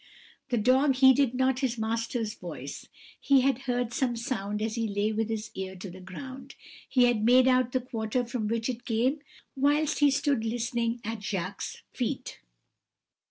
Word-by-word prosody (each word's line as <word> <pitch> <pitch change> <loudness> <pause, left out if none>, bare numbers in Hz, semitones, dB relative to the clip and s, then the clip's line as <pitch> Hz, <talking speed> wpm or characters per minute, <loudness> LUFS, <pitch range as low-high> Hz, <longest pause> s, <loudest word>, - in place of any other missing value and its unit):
"The 245 - +1
dog 260 +5 +4
heeded 265 -1 +5
not 260 0 +2
his 250 -3 -1
master's 225 0 -2
voice. - - -8 0.3
He 275 -2 +4
had 265 -1 +2
heard 245 -1 0
some 250 -2 0
sound 215 -4 -3
as 220 +1 -2
he 230 -1 -1
lay 205 +1 0
with 220 +1 -1
his 220 0 -4
ear 190 0 -5
to 185 0 -8
the 185 +1 -11
ground; 260 +8 -9 0.3
he 255 - +4
had 240 -3 +3
made 250 +3 +6
out 255 -1 +3
the 255 - 0
quarter 235 0 -2
from 235 -2 -3
which 230 +1 -1
it 245 -2 -4
came 250 +6 +1 0.4
whilst 290 +3 +2
he 290 -1 +6
stood 280 -3 +1
listening 235 +1 -1
at 225 -1 -4
Jacques' 195 -4 -4
feet. - - -3
240 Hz, 170 wpm, -28 LUFS, 220-260 Hz, 0.4 s, made